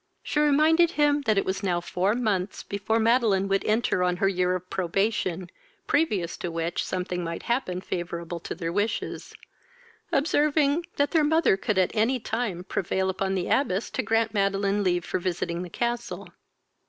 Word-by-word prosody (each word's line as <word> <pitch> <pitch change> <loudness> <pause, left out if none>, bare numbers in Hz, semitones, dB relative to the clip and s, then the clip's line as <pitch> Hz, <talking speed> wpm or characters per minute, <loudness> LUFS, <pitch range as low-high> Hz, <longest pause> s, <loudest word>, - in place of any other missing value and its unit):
She 295 - -1
reminded 310 +3 +4
him 295 -1 +3
this 220 -6 +1
it 195 - +2
was 190 +1 -2
now 180 -4 0
four 185 +4 0
months 210 -6 -1
before 205 +2 -1
Madeline 225 -4 +3
would 195 0 +1
enter 215 -3 +1
on 180 0 +1
her 195 - +2
year 180 -1 +1
of 185 0 -6
probation, 185 -1 -1 0.4
previous 195 - 0
to 175 - -4
which 165 +1 -2
something 180 -1 -3
might 165 0 -5
happen 235 -7 -1
favourable 170 -1 -4
to - - -6
their 165 -1 -4
wishes; 205 +3 -2 0.8
observing, 295 +2 +2
that 285 0 +1
their 320 -3 +3
mother 320 - +3
could 195 +1 -2
at 185 -2 +3
any 235 +4 +2
time 220 -6 -3
prevail 190 0 -1
upon 190 0 -2
the 185 - -1
abbess 210 -7 0
to - - -1
grant 225 0 +1
Madeline 200 0 +1
leave 175 -2 +1
for - - -2
visiting 175 -1 -2
the 180 - -6
castle. 235 +4 -3
195 Hz, 170 wpm, -26 LUFS, 180-240 Hz, 0.8 s, reminded